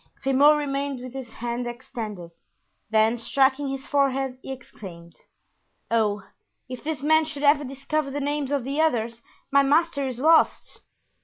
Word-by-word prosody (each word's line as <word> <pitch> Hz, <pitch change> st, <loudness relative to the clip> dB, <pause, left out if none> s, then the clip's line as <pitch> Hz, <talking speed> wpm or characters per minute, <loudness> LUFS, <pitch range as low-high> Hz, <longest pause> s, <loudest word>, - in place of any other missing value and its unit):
Grimaud 280 Hz, +3 st, +5 dB
remained 280 Hz, -2 st, -2 dB
with 250 Hz, 0 st, -9 dB
his 265 Hz, -3 st, -7 dB
hand 240 Hz, +2 st, -4 dB
extended; 220 Hz, -7 st, -7 dB, 0.6 s
then, 220 Hz, +2 st, +3 dB
striking 270 Hz, +3 st, +2 dB
his 270 Hz, 0 st, -5 dB
forehead, 270 Hz, -2 st, 0 dB
he 270 Hz, -, -7 dB
exclaimed: 180 Hz, -10 st, -11 dB, 0.8 s
"Oh! 210 Hz, -3 st, +1 dB, 0.4 s
if 255 Hz, -1 st, -8 dB
this 300 Hz, -3 st, -4 dB
man 315 Hz, +1 st, +4 dB
should 300 Hz, -2 st, -6 dB
ever 290 Hz, 0 st, +5 dB
discover 275 Hz, +2 st, -3 dB
the 285 Hz, +1 st, -3 dB
names 290 Hz, -1 st, -2 dB
of 280 Hz, -3 st, 0 dB
the 280 Hz, +4 st, -1 dB
others, 235 Hz, -6 st, 0 dB, 0.3 s
my 280 Hz, 0 st, +6 dB
master 285 Hz, 0 st, +2 dB
is 255 Hz, -2 st, -5 dB
lost." 315 Hz, +4 st, +2 dB
270 Hz, 150 wpm, -25 LUFS, 240-285 Hz, 0.8 s, my